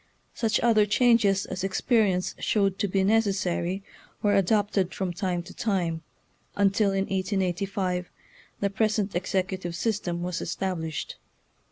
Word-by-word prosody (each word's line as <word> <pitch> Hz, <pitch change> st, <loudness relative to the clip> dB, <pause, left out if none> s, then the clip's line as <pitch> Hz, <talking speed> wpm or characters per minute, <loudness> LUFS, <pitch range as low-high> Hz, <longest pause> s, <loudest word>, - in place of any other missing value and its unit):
Such 225 Hz, -1 st, +1 dB
other 215 Hz, -3 st, +4 dB
changes 210 Hz, -3 st, +3 dB
as 185 Hz, -, -5 dB
experi 205 Hz, +3 st, +2 dB
ence 180 Hz, 0 st, -1 dB
showed 195 Hz, -2 st, +1 dB
to 205 Hz, -, +1 dB
be 190 Hz, 0 st, +1 dB
necessary 195 Hz, -3 st, +1 dB, 0.4 s
were 205 Hz, -1 st, +3 dB
adopted 200 Hz, -1 st, +1 dB
from 185 Hz, -2 st, -2 dB
time 175 Hz, -1 st, -2 dB
to 185 Hz, -, -11 dB
time, 175 Hz, -6 st, -1 dB, 0.5 s
until 200 Hz, +1 st, +3 dB
in 195 Hz, 0 st, 0 dB
1885 190 Hz, -1 st, -1 dB, 0.5 s
the 200 Hz, -1 st, +1 dB
pres 215 Hz, +1 st, +1 dB
ent 205 Hz, -1 st, -1 dB
executive 185 Hz, -1 st, -2 dB
system 175 Hz, -4 st, -2 dB
was 180 Hz, -1 st, -3 dB
established. 170 Hz, -3 st, -3 dB
195 Hz, 135 wpm, -26 LUFS, 180-205 Hz, 0.5 s, other